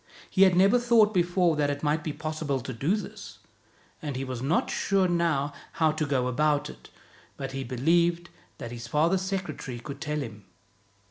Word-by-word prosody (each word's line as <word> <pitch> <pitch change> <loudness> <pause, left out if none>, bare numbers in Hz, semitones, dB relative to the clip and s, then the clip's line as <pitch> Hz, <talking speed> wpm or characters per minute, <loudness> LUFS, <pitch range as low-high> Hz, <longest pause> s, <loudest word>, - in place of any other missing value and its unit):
He 190 - +1
had 190 -2 +7
never 195 +7 +5
thought 230 -3 +4
before 175 -2 +2
that 145 -1 +2
it 145 +1 -3
might 150 +1 +1
be 155 - -2
possible 155 -2 -3
to 130 +2 -6
do 145 - +1
this, 210 - -8 0.6
and 145 -3 -4
he 130 - -3
was 130 -2 -5
not 150 +7 +1
sure 195 -2 +2
now 165 -5 0 0.2
how 160 -1 +2
to 155 0 -2
go 130 -3 +1
about 145 +3 +1
it; - - -16 0.5
but 135 -1 -5
he 135 0 -4
believed 170 +7 +1 0.3
that 115 - -7
his 120 -1 -7
father's 170 +5 +2
secretary 190 -9 -4
could 140 +4 -8
tell 150 -1 -2
him. 105 -6 -8
155 Hz, 185 wpm, -27 LUFS, 135-175 Hz, 0.6 s, had